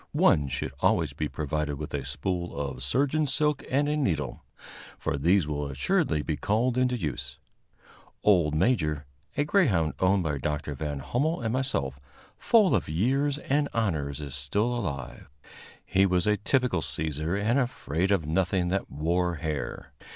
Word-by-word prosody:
One 70 -2 +4
should 65 0 -3
always 80 -5 +2
be 75 +2 -2
provided 75 -1 -2
with 75 +1 -7
a 70 -2 -2
spool 85 +7 -3
of 70 -3 -4
surgeon's 140 - +1
silk 150 -1 +1
and 145 +3 +2
a 150 - +1
needle, 90 - -1 0.5
for - - -2
these 85 +4 +3
will 75 -1 -2
assuredly 70 +2 0
be 75 -1 -2
called 110 - +1
into 125 -1 +2
use. 70 - -4 0.9
Old 85 -7 +4
Major, 75 - +1 0.3
a 145 - +3
greyhound 125 - +2
owned 95 0 +3
by 75 -3 -1
Dr. 75 +1 -2
Van 75 0 -4
Hummel 145 - 0
and 115 -1 -1
myself, 70 - -1 0.4
full 215 -5 +4
of - - -1
years 135 - +1
and 145 0 0
honors, 75 - -1
is 70 -3 -6
still 100 - 0
alive. 70 - -5 0.6
He 95 +1 +3
was 90 -1 +2
a 105 0 +3
typical 120 -3 +1
seizer 80 +4 -2
and 115 +6 +2
afraid 95 - -1
of 95 -6 +2
nothing 90 +2 +1
that 95 +2 -1
wore 85 +4 0
hair. 75 -2 -4
85 Hz, 160 wpm, -27 LUFS, 75-120 Hz, 0.9 s, One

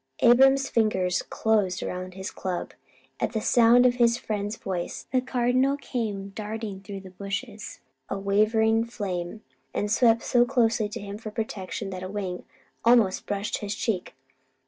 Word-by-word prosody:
Abram's 270 +3 +6
fingers 190 -5 +1
closed 205 -4 0
around 185 0 -5
his 190 0 -5
club. 185 -2 -4 0.5
At - - -1
the 220 - 0
sound 240 +2 +5
of 245 0 +3
his 235 -1 +4
friend's 210 -2 -3
voice, 180 -3 -4
the 255 - +2
Cardinal 255 +2 +1
came 215 -8 -4
darting 210 0 -5
through 195 -1 -7
the 190 -1 -12
bushes 205 +4 -6 0.3
a - - -2
wavering 220 +3 +3
flame, 200 -4 -5 0.3
and 205 0 -1
swept 230 0 +4
so 240 -1 +4
closely 230 -4 +1
to - - -6
him 200 +1 -7
for 220 - -6
protection 210 -2 -4
that 185 -1 -6
a 185 - -5
wing 190 -3 -4 0.4
almost 230 -5 +4
brushed 205 0 -2
his 205 -1 -4
cheek. 215 - -2
215 Hz, 155 wpm, -26 LUFS, 195-235 Hz, 0.5 s, Abram's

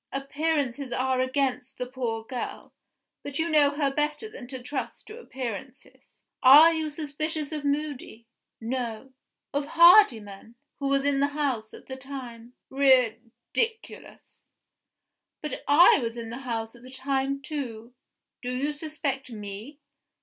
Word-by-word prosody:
Appearances 280 -2 -2
are 260 0 +1
against 260 0 -1
the 250 - -3
poor 245 -3 -3
girl; 245 +2 -6 0.5
but 285 -1 -6
you 325 +1 0
know 295 -2 +5
her 285 -1 -1
better 300 +9 -1
than 275 - -10
to 260 0 -7
trust 265 +3 -5
to 435 +2 -10
appearances. 260 - -8 0.2
Are 300 +6 +9
you 315 -1 -2
suspicious 305 0 -3
of 305 -2 -4
Moody? 285 -5 -3 0.3
No. 240 +1 -4 0.4
Of 285 0 -1
Hardyman 240 - +5 0.2
who 280 - -1
was 275 0 +2
in 285 -1 +2
the 280 - +3
house 250 -7 -1
at - - -14
the 260 - -7
time? 250 -3 -9 0.2
Ridiculous! 260 - 0 0.9
But 300 - -6
I 295 +4 +7
was 230 0 -4
in 230 -1 -6
the 240 - -6
house 230 -3 -4
at 240 - -16
the 255 - -12
time, 270 +1 -1
too. 250 -5 -6 0.5
Do 250 - -3
you 275 +4 -1
suspect 295 -3 -4
Me? 215 +6 -8
270 Hz, 140 wpm, -27 LUFS, 245-295 Hz, 0.9 s, Are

